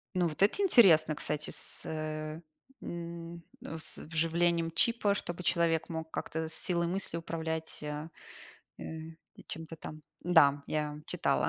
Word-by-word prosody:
Ну, 180 -1 +3
вот 155 +3 0
это 215 - +3
интересно, 180 - +6
кстати, 150 +1 -2
с, - - +1
эм, 165 - -6 0.2
с 160 -1 -3
вживлением 165 +1 +1
чипа, 210 +2 +3
чтобы 175 -3 -4
человек 165 -2 +2
мог 160 -1 -5
как-то 160 0 -3
с 160 - 0
силой 170 +1 0
мысли 185 -2 -2
управлять, 160 -1 -3
а, 150 +2 -4 0.7
э, - - -8 0.6
чем-то 165 0 -7
там. 155 0 -9 0.2
Да, 145 -5 +5
я 150 -1 -2
читала. - - +1
165 Hz, 130 wpm, -31 LUFS, 155-170 Hz, 0.7 s, интересно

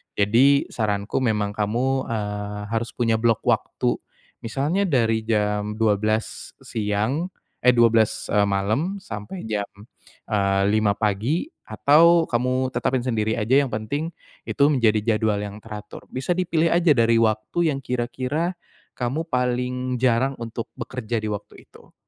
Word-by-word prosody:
Jadi 125 +8 +3
saranku 105 -1 -1
memang 105 -5 0
kamu, 120 +6 -1
eee, 105 -2 -4
harus 115 0 -2
punya 115 -2 +1
blok 115 -1 +1
waktu. - - 0 0.4
Misalnya 150 - -1
dari 115 -7 +2
jam 105 -1 0
12:00 110 0 -1
siang, 110 - -1 0.3
eh, 125 - +5
12:00, 115 -3 +3
eee, 105 0 +4
malem 110 - 0
sampai 115 - -7
jam, 105 -2 -2 0.6
eee, 100 -2 +2
5:00 110 -2 +3
pagi 110 - 0 0.2
atau 160 +10 +5
kamu 130 +1 0
tetapin 130 -1 0
sendiri 110 -3 0
aja 125 +6 +3
yang 135 - -2
penting 120 +9 -3 0.4
itu 140 - +1
menjadi 115 -4 +3 0.2
jadwal 110 -2 +1
yang 105 0 -6
teratur. 105 -2 -9
Bisa 130 +7 -1
dipilih 170 -2 +1
aja 170 -3 +4
dari 115 0 +4
waktu 110 +10 +1
yang - - -3
kira-kira 130 +7 -2 0.4
kamu 125 +5 -1
paling 125 -1 -1
jarang 130 +2 +2
untuk 115 0 -5
bekerja 120 -2 -4
di 110 - -3
waktu 105 -1 -7
itu. - - -19
115 Hz, 135 wpm, -23 LUFS, 105-130 Hz, 0.6 s, eh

